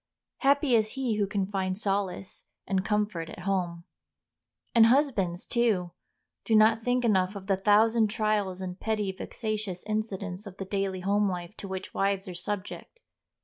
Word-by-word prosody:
Happy 280 -1 +3
is 215 -1 +2
he 255 -5 -1
who 205 -1 +1
can 200 -1 -1
find 190 -1 -2
solace 195 -2 -2 0.2
and 190 -1 0
comfort 205 -6 -1
at - - -9
home. 180 -3 -1 0.9
And 230 -2 +7
husbands, 230 - +2
too, 215 -8 +1 0.5
do 225 - +2
not 220 +1 +5
think 245 0 +1
enough 190 -3 +2
of 195 -1 -7
the 195 0 +2
thousand 215 +3 +4
trials 210 -4 -1
and 185 0 -5
petty, 215 -3 -1
vexatious 210 -2 -4
incidents 210 -2 -3
of 195 -1 -10
the 195 - -5
daily 195 -1 -2
home 200 +2 +2
life 180 +2 -5
to 200 - -7
which 190 0 -6
wives 195 0 0
are 180 - -5
subject. 205 - -5
200 Hz, 160 wpm, -28 LUFS, 190-215 Hz, 0.9 s, And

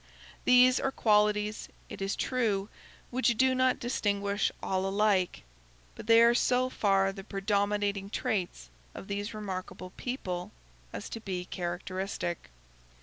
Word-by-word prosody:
These 250 0 +6
are 270 - 0
qualities, 210 -2 +1 0.2
it - - -9
is 195 0 -1
true, 215 -6 0 0.4
which 245 -2 +1
do 260 +1 +4
not 255 0 +2
distinguish 200 -4 0
all 190 0 0
alike; 195 -2 +1 0.5
but - - -11
they 230 0 +7
are 235 0 +6
so 255 +1 +2
far 195 -3 +2
the 195 -1 -9
predominating 200 0 -1
traits 185 - -3 0.2
of - - -8
these 205 +2 -4
remarkable 185 -3 -6
people 185 -9 -4 0.4
as 100 - -6
to 225 - -6
be 185 -4 -4
characteristic. 180 - -4
205 Hz, 130 wpm, -30 LUFS, 195-230 Hz, 0.5 s, they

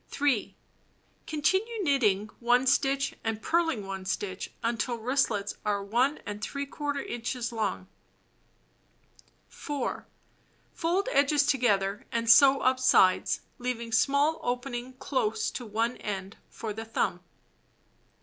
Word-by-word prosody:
3. 280 -7 0 0.7
Continue 390 +8 0
knitting 220 - +2
1 245 +2 +3
stitch 275 +1 +2
and 225 -1 -2
purling 325 -8 0
1 195 -1 -5
stitch 190 0 -3
until 230 +1 -1
wristlets 225 -4 0
are 200 -1 -1
If 280 +4 -2
inches 240 0 -3
long. 215 -5 -2 1.6
4. 290 -2 -4 0.7
Fold 355 +6 0
edges 285 - +3
together 205 -7 +1
and 230 0 -1
sew 270 +3 +7
up 255 0 +2
sides, 190 -7 +4 0.2
leaving 240 -2 -3
small 280 +7 +2
opening 245 0 -3
close 435 - -1
to 245 - -6
one 225 +3 -1
end 195 -1 -5
for 220 -2 -5
the 220 +2 -6
thumb. 220 -5 -1
245 Hz, 110 wpm, -28 LUFS, 215-280 Hz, 1.6 s, sew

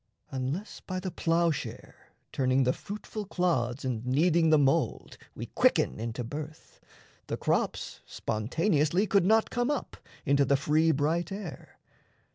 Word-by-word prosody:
Unless, 135 +10 -4
by 185 -1 -5
the 185 0 -4
ploughshare 165 -3 -2 0.2
turning 130 0 +2
the 125 0 +2
fruitful 210 +1 -6
clods 135 - 0
And 120 -3 -2
kneading 160 +6 +3
the 155 - +6
mould, 135 -2 +1 0.2
we - - -5
quicken - - +2
into 115 +2 -3
birth, 150 +5 -8 0.5
[The - - -2
crops] - - -1
spontaneously 150 - 0
could 200 -3 +3
not 220 +1 +3
come 245 +2 0
up 295 -3 -3 0.3
Into 140 0 +4
the 140 +1 +3
free 155 +4 +3
bright 160 +4 0
air. 195 -3 -8
155 Hz, 135 wpm, -29 LUFS, 130-180 Hz, 0.5 s, the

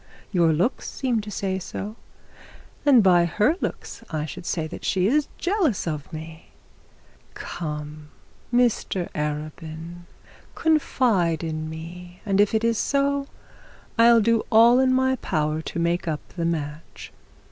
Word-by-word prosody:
Your 170 -4 +3
looks 175 - 0
seem 245 -5 -1
to 210 - -8
say 190 -2 -2
so; 205 +3 -6 0.9
and 255 -6 +7
by 175 -2 +5
her 210 - +2
looks - - -5
I 155 -1 -2
should 160 +3 -8
say 160 -3 -1
that 155 - -8
she 185 -1 +1
is 285 +7 +2
jealous 350 - 0
of 150 -4 -4
me. 160 +1 -8 0.9
Come, 150 -2 -6 0.4
Mr 240 -7 +1
Arabin, 155 +3 -5 0.5
confide 230 - +2
in 155 -1 -3
me, 175 +3 -9
and 200 -1 +3
if 210 +2 +2
it 220 - +1
is 230 -1 +2
so, 280 0 +1 0.7
I'll 230 0 +6
do 230 +1 +2
all 235 +3 +7
in 260 0 +4
my 260 0 +2
power 155 -5 -1
to 160 - -6
make 170 +1 0
up 155 -2 -3
the 170 -2 -4
match.' 155 -1 -4
180 Hz, 140 wpm, -24 LUFS, 160-230 Hz, 0.9 s, and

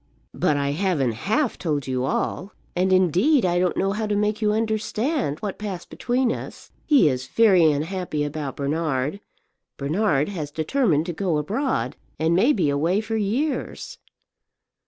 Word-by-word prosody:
"But 145 - +1
I 140 0 0
haven't 155 -6 0
half 220 - -1
told 150 -5 -1
you 130 -1 -1
all; 190 +8 -2 0.2
and, 185 +1 +1
indeed, 185 - +3
I 175 0 +2
don't 180 -1 0
know 195 +1 +1
how 215 +1 -2
to 210 - 0
make 210 +1 0
you 210 -1 +2
understand 220 - -1
what 205 -3 -4
passed 195 -4 -6
between 250 0 0
us. - - -7 0.2
He 285 - +5
is 130 -2 -1
very 185 -8 +5
unhappy 155 0 -2
about 145 -2 -4
Bernard; 145 +2 -1 0.6
Bernard 150 0 +1
has 160 -7 -4
determined 160 - +1
to 175 - -3
go 175 -2 0
abroad, 175 - -1 0.2
and 160 +2 +1
may 225 +11 +4
be 175 - +1
away 165 +8 +1
for 225 +1 -3
years." 225 +9 -2
180 Hz, 155 wpm, -23 LUFS, 150-215 Hz, 0.6 s, He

